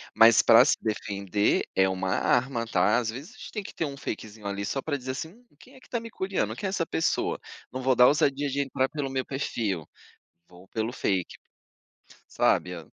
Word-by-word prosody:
mas 115 0 +7
para 115 +3 +7
se - - +4
defender 100 -2 0
é 95 0 +4
uma 95 0 -2
arma 120 +4 +1
tá, 105 +3 +3
às 115 -2 -1
vezes 145 - -8
a - - -18
gente - - -9
tem 210 -3 -4
que - - -10
ter 165 - -2
uma 140 -1 -6
fakezinho 110 -4 -6
ali 100 0 -3
só 135 +7 -2
para 145 -1 -2
dizer 130 0 -5
assim: 160 +5 -5
"Hum, 240 +7 -21
quem 260 +2 -17
é - - -14
que - - -20
está 235 - -2
me 230 0 -9
curiando? 190 -2 -2
Quem 200 - -3
é - - -1
essa 180 -4 -1
pessoa? 165 - 0 0.3
Não 130 +1 -5
vou 130 0 +2
dar 125 +1 +7
ousadia 145 -1 +2
de 140 +1 0
entrar 130 -1 -1
pelo 145 -3 -3
meu 130 -1 -1
perfil. 110 - -3 0.6
Vou 90 +1 -16
pelo 115 +1 -2
fake". 95 -7 -1 0.9
Sabe, 90 0 +1
a 80 -3 -9
130 Hz, 215 wpm, -27 LUFS, 105-145 Hz, 0.9 s, mas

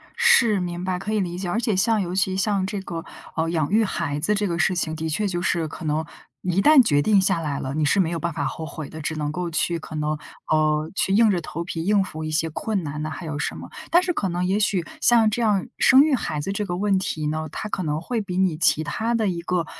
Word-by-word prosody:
是， 370 - +4
明 175 -1 -4
白， 185 -1 -1
可 210 +3 -4
以 215 - +1
理 175 -2 -2
解。 185 -1 -4
而 210 - 0
且 225 -4 0
像 215 +3 +2
尤 180 -1 -3
其 190 0 +1
像 195 -1 +1
这 200 +1 -3
个， 165 -3 -6 0.3
呃， 165 0 0
养 160 -2 -1
育 220 +2 +4
孩 145 -7 -2
子 205 +8 +1
这 205 0 0
个 170 -1 -2
事 185 +1 +2
情， 160 -2 -1
的 160 0 -3
确 205 +7 0
就 175 -2 -2
是 170 -2 0
可 165 - -9
能， 155 +1 0 0.4
一 180 +1 +1
旦 295 +2 +7
决 145 -9 +3
定 205 +5 +4
下 190 -2 +2
来 150 -4 -3
了， 130 - -4
你 155 +1 0
是 170 +8 +2
没 175 -4 +2
有 170 - -2
办 170 0 -2
法 145 - -2
后 160 +4 -4
悔 155 -1 -7
的。 160 - -8
只 160 +1 -3
能 150 -1 -2
够 175 +1 -3
去 170 +1 0
可 155 - -9
能， 150 0 -1 0.3
呃， 155 0 +2
去 190 - +1
硬 220 0 +5
着 175 - 0
头 165 +1 -5
皮 165 -1 -4
应 200 +2 +3
付 160 -4 -7
一 155 - -3
些 160 +1 0
困 200 +3 -2
难 150 0 -4
啊， - - -3
还 170 +3 -7
有 150 -2 -4
什 - - -2
么。 - - -9 0.2
但 350 +2 +4
是 360 -1 0
可 195 - -1
能 175 +1 -1
也 195 +3 +1
许 195 -5 +1 0.2
像 230 -2 +5
这 215 +3 -2
样， 210 -3 +1
生 265 0 +7
育 305 -1 +1
孩 155 - -1
子 170 +7 -3
这 210 +1 -2
个 175 -2 -3
问 195 0 +2
题 155 -5 -3
呢， 155 +1 -2
它 - - -5
可 190 - -2
能 150 -1 -1
会 230 +6 -2
比 185 -3 -5
你 185 -5 +2
其 155 -1 +3
他 220 +8 -1
的 220 -2 +1
一 175 -3 -2
个， 175 0 -1
175 Hz, 295 characters per minute, -23 LUFS, 155-205 Hz, 0.4 s, 旦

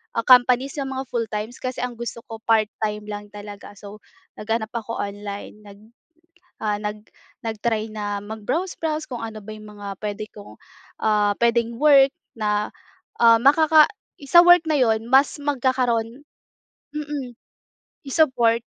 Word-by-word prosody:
ah, 230 - 0
companies 255 +1 +5
yung 270 -1 -3
mga 265 - -3
full 235 -1 -1
times, 215 +3 -5
kasi 255 0 -4
ang 250 -1 -4
gusto 235 0 -6
ko 225 -1 -8
part 220 -2 +4 0.2
time 210 0 -2
lang 205 0 -6
talaga. 205 0 -10
So 205 +1 -11 0.4
naghanap 220 +1 -2
ako 230 0 -4
online 205 +1 -7
nag, 200 -1 -13 0.8
ah, 210 -1 0
nag 210 0 -6 0.4
nag-try 220 0 -2
na 205 -1 -4
mag-browse 220 - -4
browse 310 -1 -2
kung 250 - -4
ano 220 -1 -7
ba 205 - -13
yung 215 0 -12
mga 200 -1 -7
puwede 210 0 -4
kong, 205 -1 -12 0.5
ah, 210 -1 +2
puwedeng 235 0 +2
work 275 -2 +6 0.2
na, 210 -1 0 0.5
ah, 230 -1 +7
makaka 310 +3 +6 0.4
sa 345 - +9
work 350 0 +8
na 305 - +2
'yon 225 -2 +1
mas 270 +4 +4
magkakaroon 255 -3 0 0.7
mm, 295 -4 -5 0.8
i-support. 250 -6 +2
230 Hz, 145 wpm, -22 LUFS, 210-260 Hz, 0.8 s, sa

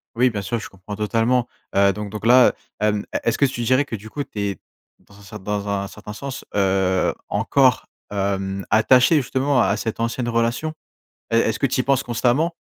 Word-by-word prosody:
Oui, 125 +2 +4
bien 105 -2 -3
sûr, 110 +4 -2
je 105 - -8
comprends 95 +2 -9
totalement. 115 +4 +1 0.3
Heu, 100 0 +4
donc 105 0 -6
donc 105 +1 -7
là, 125 +2 +6 0.3
hem, 105 -1 0 0.2
est-ce 115 - +1
que 140 - +4
tu 130 -3 -3
dirais 130 +4 +3
que, 120 - -5
du 110 +1 -10
coup, 145 +5 -4
tu 105 - -9
es, 100 -3 -2 0.4
dans 100 - -21
un - - -15
ce 100 +2 -12
dans 105 0 -3
un 100 -1 -1
certain 105 +1 -10
sens, 135 +4 -6
heu, 95 -2 +2 0.2
encore, 130 -2 +2 0.3
hem, 95 -1 -2
attaché 125 +7 +5
justement 135 -1 +1
à 105 - +2
cette 110 +1 -4
ancienne 115 +1 -1
relation? 115 +6 0 0.6
Et 115 - +2
est-ce 110 -1 +1
que - - +2
tu 130 0 0
y - - +2
penses 135 0 +2
constamment? 125 +8 +1
115 Hz, 205 wpm, -22 LUFS, 100-125 Hz, 0.6 s, là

